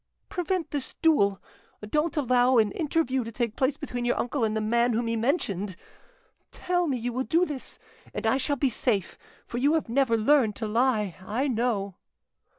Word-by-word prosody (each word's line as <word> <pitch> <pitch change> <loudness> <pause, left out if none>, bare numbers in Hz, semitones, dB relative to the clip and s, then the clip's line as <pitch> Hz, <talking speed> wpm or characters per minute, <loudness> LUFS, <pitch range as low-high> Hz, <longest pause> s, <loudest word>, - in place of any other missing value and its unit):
"Prevent 355 -3 -2
this 285 -3 -4
duel; 200 - +4 0.5
don't 300 +7 0
allow 255 -2 +3
an 215 -3 +4
interview 280 - 0
to 230 - -7
take 235 -1 -2
place 270 +2 +1
between 245 -5 -4
your 240 - +1
uncle 245 +1 -1
and 220 0 +1
the - - +1
man 235 +3 +2
whom 235 +2 0
he 230 0 -1
mentioned. 210 - -1 0.8
Tell 355 -1 -1
me 270 -4 0
you 240 +1 -3
will 255 +2 -1
do 335 +6 +2
this, 290 -6 -6 0.3
and - - -5
I 225 +4 +3
shall 285 +2 0
be 270 -1 +1
safe; 210 -5 -1 0.3
for 240 - -4
you 290 +5 +3
have 315 - -1
never 240 -2 +2
learned 225 -2 +3
to 225 - -4
lie; 215 -4 +1
I 235 +9 -1
know." 225 -6 -1
245 Hz, 185 wpm, -27 LUFS, 220-285 Hz, 0.8 s, duel